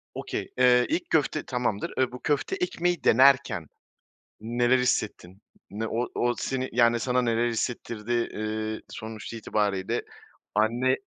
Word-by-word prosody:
Okay. - - -4
Eee, 125 -1 +5
ilk 175 - -1
köfte 155 0 +1
tamamdır, 125 -5 -2
eee, 130 -1 +2
bu 125 - -8
köfte 145 -2 0
ekmeği 175 -1 -1
denerken 130 - +4 0.7
neler 120 +3 +2
hissettin? 100 -6 -1 0.3
Ne 110 +2 -4
o 120 +3 -1
o 120 0 +1
seni, 130 -1 -2
yani, 120 0 +4
sana 125 +1 +1
neler 120 0 +1
hissettirdi? 115 -1 -3
Eee, 110 -2 -2
sonuç 110 +1 -7
itibarıyla 105 -4 -1 0.5
anne 120 +5 +2
120 Hz, 130 wpm, -27 LUFS, 110-130 Hz, 0.7 s, Eee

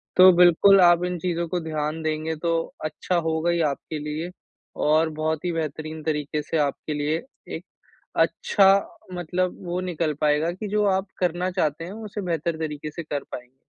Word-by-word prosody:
तो 185 0 +9
बिल्कुल 180 +3 +7
आप 175 0 +6
इन 180 0 -2
चीज़ों 170 -1 -1
को 180 - -1
ध्यान 155 0 -3
देंगे, 155 +1 -1
तो 165 +1 -1
अच्छा 155 +4 -2
होगा 160 +1 +1
ही 170 -1 +1
आपके 150 +2 -5
लिए 150 +3 -4 0.6
और 160 +1 +4
बहुत 155 +1 -1
ही 175 - +1
बेहतरीन 155 -1 -4
तरीके 150 -1 -1
से 160 +2 -2
आपके 150 +1 -1
लिए 150 +2 -1 0.3
एक, - - -7 0.5
अच्छा 195 -2 +3 0.5
मतलब 180 +1 -1
वो 175 +1 -2
निकल 170 -4 -1
पाएगा 150 +2 +2
कि 200 +4 -6
जो 210 +1 +1
आप 190 0 +1
करना 180 +1 0
चाहते 165 -3 -1
हैं, 175 - -7
उसे 210 -1 -6
बेहतर 170 -2 -2
तरीके 150 -1 -4
से 170 +3 -6
कर 145 -2 -4
पाएँगे। 125 +1 -9
165 Hz, 175 wpm, -24 LUFS, 155-180 Hz, 0.6 s, तो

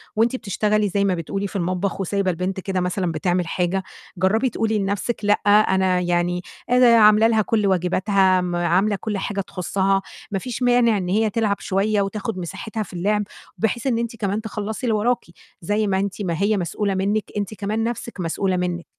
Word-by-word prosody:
وأنتِ 230 +3 +2
بتشتغلي 210 -2 0
زي 200 +2 0
ما 195 - +2
بتقولي 195 +4 -3
في 200 - -13
المطبخ، 185 +2 -1
وسايبة 195 0 0
البنت 185 +2 -3
كده 190 0 -2
مثلًا 180 0 -1
بتعمل 175 +2 0
حاجة، 180 +3 -1 0.3
جرّبي 215 +8 +2
تقولي 220 -1 0
لنَفْسِك 200 +4 -1
لأ، 205 - +5
أنا 190 -3 +4
يعني 175 0 0 0.3
أنا 250 0 +5
عاملة 215 0 +6
لها 220 -1 +3
كُلّ 210 -1 +1
واجباتها، 190 +1 +2
آمم، 180 -1 -2
عاملة 175 +5 +2
كُلّ 210 +1 -3
حاجة 200 +1 -2
تخصّها، 195 +1 0 0.3
ما 195 - -1
فيش 250 +4 -5
مانع 245 -3 +4
إن 180 -2 -3
هي 215 +3 +2
تلعب 210 -1 0
شويّة 200 +2 0
وتاخد 210 +1 -3
مساحتها 200 +5 -5
في 195 - -13
اللعب، 205 +4 0 0.3
بحيث 225 +3 -1
إن 240 -3 +1
أنتِ 235 0 -3
كمان 205 -1 -2
تخلّصي 220 +2 -5
اللي 225 - +2
وراكِ، 240 +4 0 0.4
زي 205 +5 0
ما 190 -1 +1
أنت 200 +1 -3
ما 175 -4 -1
هي 205 +1 +2
مسؤولة 195 +2 -1
منِّك، 200 +3 -1
أنتِ 205 -1 -2
كمان 215 +2 -2
نَفْسِك 235 -2 -4
مسؤولة 185 +2 -1
منِّك. 175 -1 -2
200 Hz, 185 wpm, -22 LUFS, 185-215 Hz, 0.4 s, عاملة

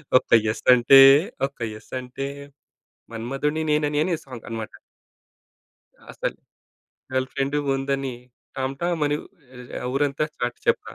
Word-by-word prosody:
ఒక్క 130 - +3 0.2
యెస్సంటే, 125 +4 +6 0.5
ఒక్క 140 - -22
యెస్సంటే, 130 +4 -6 0.9
మన్మధుడిని 135 +7 -2
నేననేనే 150 +3 +1
సాంగ్ 125 -4 -10
అనమాట. 110 -1 -6 1.3
'అసలు. - - -4 0.8
గర్ల్ 130 0 0
ఫ్రెండు 140 +2 -1 0.2
ఉందని, 135 -1 -2 0.4
టాంటామనీ 145 +3 -1 0.4
ఆహ్, 125 0 -7
ఊరంతా 145 +2 0
చాటి 120 0 -3
చెప్తా.' - - 0
135 Hz, 95 wpm, -24 LUFS, 125-145 Hz, 1.3 s, యెస్సంటే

